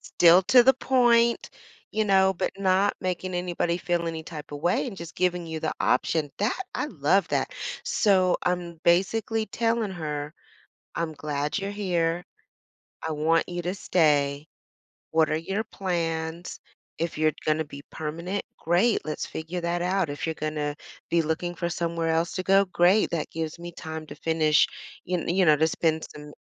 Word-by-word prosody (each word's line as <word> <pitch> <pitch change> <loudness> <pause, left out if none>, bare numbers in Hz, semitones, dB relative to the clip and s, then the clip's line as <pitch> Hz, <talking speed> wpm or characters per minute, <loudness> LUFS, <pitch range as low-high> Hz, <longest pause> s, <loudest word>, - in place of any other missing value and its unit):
still 175 +2 +5
to 245 +5 +7
the 265 +2 +6
point, 235 -3 +3 0.4
you 215 0 0
know, 190 -1 +4
but - - -1
not 195 +1 +2
making 185 0 -3
anybody 175 -1 -1
feel 175 -1 -1
any 160 -1 -4
type 155 -2 -9
of 145 - -6
way 175 - +1
and 215 - -6
just 170 -2 -8
giving 180 -1 0
you 160 -1 -5
the - - -1
option. 145 +3 +1
That 210 - 0 0.2
I - - -1
love - - +1
that. - - 0 0.3
So, 185 -4 +3
I'm 175 -1 -1
basically 220 +5 +2
telling 230 -2 0
her, 150 -3 -4 0.6
I'm 165 -1 -2
glad 150 +1 -2
you're 200 0 -3
here. 175 -4 0 0.8
I 160 - -2
want 160 +2 +2
you 175 0 -3
to 180 +2 -1
stay. 145 -5 +2 0.6
What 160 -1 +3
are 155 - +1
your 195 +6 -2
plans? 170 -4 -3 0.4
If 165 -2 -2
you're 155 0 +3
gonna 155 +1 +1
be 140 -1 -10
permanent, 170 +6 -4
great, 180 +8 +2
let's 155 - -3
figure 160 +3 -5
that 170 +1 -1
out, 185 -2 +1
if 145 - -4
you're 160 - -2
gonna 150 -1 -3 0.3
be 170 - +3
looking 175 +3 -2
for 170 +1 -2
somewhere 170 -1 -2
else 165 +1 +1
to 185 - -3
go, 195 +1 +4
great 185 +3 +3
that 165 - -2
gives 160 0 -4
me 175 0 -7
time 160 -1 -7
to 145 - -9
finish, 155 -1 +3 0.4
you 180 -1 -1
you 185 +2 +3
know, 155 -2 +6
to 160 - +3
spend 160 -1 0
some 150 0 -10
170 Hz, 170 wpm, -26 LUFS, 160-185 Hz, 0.8 s, to